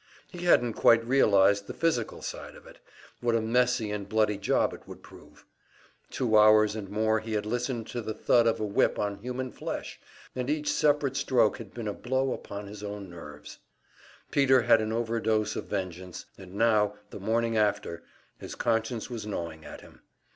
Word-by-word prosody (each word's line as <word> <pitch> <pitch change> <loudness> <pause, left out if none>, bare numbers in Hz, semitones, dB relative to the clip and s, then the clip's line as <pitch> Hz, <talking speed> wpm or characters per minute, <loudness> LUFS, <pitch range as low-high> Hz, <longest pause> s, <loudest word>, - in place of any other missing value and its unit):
He 175 -1 -8
hadn't 120 -9 +4
quite 115 +1 +4
realized 100 -6 +4
the - - -7
physical 165 -1 -1
side - - -7
of - - -15
it, - - -15 0.4
what 120 -1 +1
a - - +3
messy 120 -1 +1
and 105 -1 -5
bloody 105 -2 +1
job 100 - +1
it - - -12
would - - -11
prove. - - -16 0.6
Two 110 -4 +2
hours 105 0 +5
and 105 -3 -6
more 110 +1 +1
he 110 +1 -6
had 105 -1 -1
listened 120 +1 -2
to 120 - -4
the 110 -1 -5
thud 115 +1 +3
of 115 0 +1
a 110 - -1
whip 100 - +1
on 100 -1 -2
human 125 +3 -5
flesh, - - -6 0.4
and 125 +1 -3
each 150 0 0
separate 145 -2 +2
stroke 120 -5 +2
had 115 - -9
been 115 -2 -6
a 105 - -2
blow 130 +3 -1
upon 100 0 -7
his 100 +1 -10
own 100 -2 -7
nerves. 75 -3 -11 0.7
Peter 135 -3 +4
had 115 -1 +5
an 110 0 -2
overdose 110 -2 0
of - - -4
vengeance; 90 -3 -5
and 95 -1 -12
now, 105 -2 +2 0.2
the - - -8
morning 115 +3 0
after, 105 -5 0 0.4
his - - -8
conscience 115 0 -1
was 115 -3 -5
gnawing 85 -6 -5
at - - -10
him. - - -17
110 Hz, 185 wpm, -28 LUFS, 105-120 Hz, 0.7 s, hours